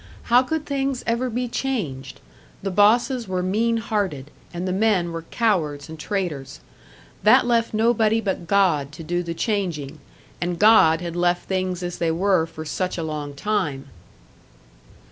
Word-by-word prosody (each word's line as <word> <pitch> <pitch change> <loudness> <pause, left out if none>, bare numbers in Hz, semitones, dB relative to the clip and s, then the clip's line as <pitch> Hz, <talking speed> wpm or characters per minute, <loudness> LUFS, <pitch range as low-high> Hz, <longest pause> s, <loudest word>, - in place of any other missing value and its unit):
How 245 - +8
could 305 +4 -3
things 275 -2 -2
ever 235 +2 0
be 245 +2 -2
changed? 145 - -4 0.4
The 195 - -2
bosses 230 +5 +3
were 185 -1 -2
mean 225 +5 +1
hearted, 195 - -2 0.2
and 175 +2 -4
the - - -1
men 190 -4 +1
were 165 0 -4
cowards 155 - 0
and 160 0 -9
traitors. 150 -8 -4 0.6
That 245 +4 +5
left 235 -1 +1
nobody 225 0 +2
but 190 -5 -3
God 175 -8 +2
to 165 - -9
do 175 +3 -1
the 170 -1 -5
changing 165 - -2 0.4
and 175 0 -1
God 175 -6 +6
had 170 -1 -5
left 175 0 0
things 185 -1 -2
as 175 0 -5
they 170 - +1
were 175 0 +2
for 160 -1 -9
such 180 +5 -2
a 165 - -2
long 150 -2 -5
time! 150 -7 -2
185 Hz, 160 wpm, -23 LUFS, 160-225 Hz, 0.6 s, How